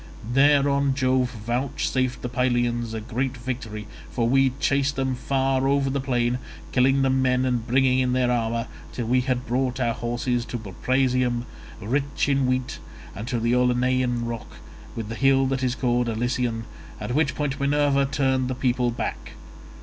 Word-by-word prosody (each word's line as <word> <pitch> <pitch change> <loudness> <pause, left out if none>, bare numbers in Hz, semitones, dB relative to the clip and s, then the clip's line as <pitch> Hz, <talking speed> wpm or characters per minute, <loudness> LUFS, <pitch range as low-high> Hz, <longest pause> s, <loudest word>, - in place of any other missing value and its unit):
Thereon 140 0 +4
Jove 130 -1 +2
vouchsafed 125 +2 -2
the - - -1
Pylians 120 -2 0
a 110 - -3
great 125 +3 -2
victory, 115 -4 -5 0.2
for 115 -2 0
we 135 +2 +4
chased 140 0 +1
them 130 0 0
far 135 +1 0
over 140 -1 +2
the 140 0 -1
plain, 125 -2 0 0.3
killing 135 +1 +3
the 135 - +3
men 130 -1 +2
and 120 -3 -1
bringing 130 +1 +3
in 125 -1 +1
their 125 -1 +2
armour, 115 -1 0 0.3
till 120 - -4
we 125 +3 +2
had 125 -1 -1
brought 130 +2 -1
our 120 -2 +1
horses 120 +1 -1
to 120 +1 -4
Buprasium, 125 +3 0 0.3
rich 140 +9 -1
in 135 -2 +2
wheat, 130 0 -1 0.4
and 105 +4 -6
to 120 -1 -1
the 115 +1 +1
Olenian 125 -1 +1
rock, 115 -1 -6 0.4
with 115 -2 -4
the 115 - -5
hill 135 +2 +3
that 135 0 -1
is 130 -1 0
called 120 0 +1
Alision, 115 0 -1 0.4
at 125 - -4
which 145 0 +1
point 145 -1 -2
Minerva 140 -1 +2
turned 130 -1 +1
the 130 - -2
people 125 -1 +1
back. 120 -1 -4
125 Hz, 165 wpm, -24 LUFS, 120-135 Hz, 0.4 s, Thereon